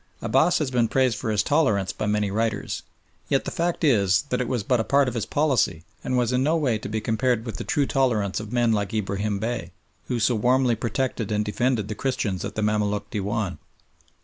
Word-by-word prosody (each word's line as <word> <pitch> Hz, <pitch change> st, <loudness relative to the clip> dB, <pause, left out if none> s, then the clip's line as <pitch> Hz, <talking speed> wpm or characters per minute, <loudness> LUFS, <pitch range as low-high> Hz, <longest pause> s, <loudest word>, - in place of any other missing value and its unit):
Abbass 175 Hz, +2 st, +3 dB
has 145 Hz, -4 st, -1 dB
been 120 Hz, -2 st, +2 dB
praised 130 Hz, -1 st, +2 dB
for 115 Hz, -, -4 dB
his 105 Hz, -2 st, +2 dB
tolerance 105 Hz, -11 st, +1 dB
by -, -, -3 dB
many 105 Hz, -1 st, 0 dB
writers, 110 Hz, +2 st, -1 dB, 0.5 s
yet 135 Hz, -, +1 dB
the -, -, -3 dB
fact 170 Hz, 0 st, -1 dB
is 100 Hz, -, +3 dB
that 125 Hz, -, +1 dB
it 125 Hz, -, -2 dB
was 120 Hz, -4 st, -1 dB
but 125 Hz, +3 st, +1 dB
a -, -, +1 dB
part 140 Hz, +3 st, +3 dB
of 125 Hz, -, -2 dB
his 115 Hz, -3 st, -3 dB
policy, 130 Hz, -, +1 dB, 0.2 s
and 130 Hz, -, 0 dB
was 120 Hz, -1 st, +1 dB
in 125 Hz, -, +2 dB
no 155 Hz, +5 st, +2 dB
way 125 Hz, -8 st, +1 dB
to -, -, -6 dB
be 110 Hz, +1 st, -1 dB
compared 115 Hz, +1 st, 0 dB
with 115 Hz, -, -5 dB
the -, -, -4 dB
true 145 Hz, -2 st, +1 dB
tolerance 115 Hz, -8 st, +1 dB
of 105 Hz, 0 st, -8 dB
men 120 Hz, -2 st, +2 dB
like 105 Hz, +1 st, -1 dB
Ibrahim 100 Hz, 0 st, -1 dB
Bey, 110 Hz, -6 st, -4 dB, 0.3 s
who 125 Hz, -, -1 dB
so 120 Hz, +3 st, +3 dB
warmly 125 Hz, +2 st, +3 dB
protected 115 Hz, -1 st, -2 dB
and 105 Hz, 0 st, 0 dB
defended 115 Hz, 0 st, 0 dB
the 110 Hz, -, -3 dB
Christians 105 Hz, -6 st, -2 dB
at 100 Hz, -, -5 dB
the 110 Hz, -, -1 dB
Mamaluk 105 Hz, -1 st, 0 dB
Dewan. 105 Hz, -3 st, -2 dB
115 Hz, 220 wpm, -24 LUFS, 105-130 Hz, 0.5 s, Abbass